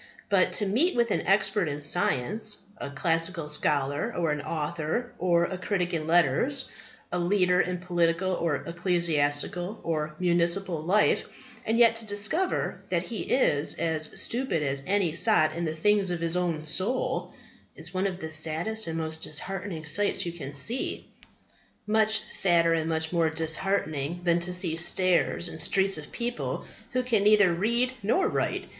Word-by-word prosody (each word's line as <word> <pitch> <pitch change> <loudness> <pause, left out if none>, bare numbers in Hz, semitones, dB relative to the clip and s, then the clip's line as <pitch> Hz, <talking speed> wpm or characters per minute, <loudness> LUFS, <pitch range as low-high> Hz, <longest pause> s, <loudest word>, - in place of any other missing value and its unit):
But 185 -2 +3
to 205 - +3
meet 265 - +1
with 235 -2 +1
an - - -1
expert 195 -1 +2
in 145 0 -5
science, 185 - 0 0.2
a 140 - -5
classical 165 +3 0
scholar, 145 -1 -1
an 155 -4 -1
author 160 +9 -3
or 170 -2 +3
a 185 +1 -5
critic 180 -2 -1
in 155 -2 -2
letters, 175 - +2 0.4
a 180 - -1
leader 180 0 +3
in 180 0 -2
political 175 0 0
or 170 -5 -1
ecclesiastical 170 +2 0
or 155 -2 -2
municipal 175 0 +1
life, 195 +6 +2 0.4
and 225 +1 +1
yet 230 -1 +5
to 225 -1 -4
discover 215 - -1
that 170 -1 0
he 225 +3 -6
is 150 - +3
as 160 -2 -2
stupid 230 - -1
as 135 -1 0
any 190 -4 +1
sot 165 -4 +3
in 170 +1 -3
the 160 0 -3
things 200 +3 +2
of 175 -1 -2
his 165 +1 -1
own 170 -4 -1
soul, 190 - -1 0.4
is 170 +2 -6
one 185 +1 0
of 185 -2 -4
the 160 -3 -7
saddest 165 +8 -1
and 165 0 -3
most 160 0 -3
disheartening 175 +1 -4
sights 200 +7 0
you 170 - -3
can 145 -4 -7
see. 225 - 0 0.8
Much 220 0 +2
sadder 170 -3 +4
and 160 0 -1
much 160 +1 -1
more 165 -2 +2
disheartening 160 -1 -1
than 170 -1 +2
to 175 +1 -2
see 180 -3 -1
stairs 175 +1 +2
and 160 -1 -4
streets 190 +1 +2
of 150 - -11
people 240 0 -4 0.3
who 255 0 +1
can 235 -5 +1
neither 205 -4 +5
read 235 +8 0
nor 365 - +2
write. - - -1
175 Hz, 165 wpm, -27 LUFS, 160-205 Hz, 0.8 s, yet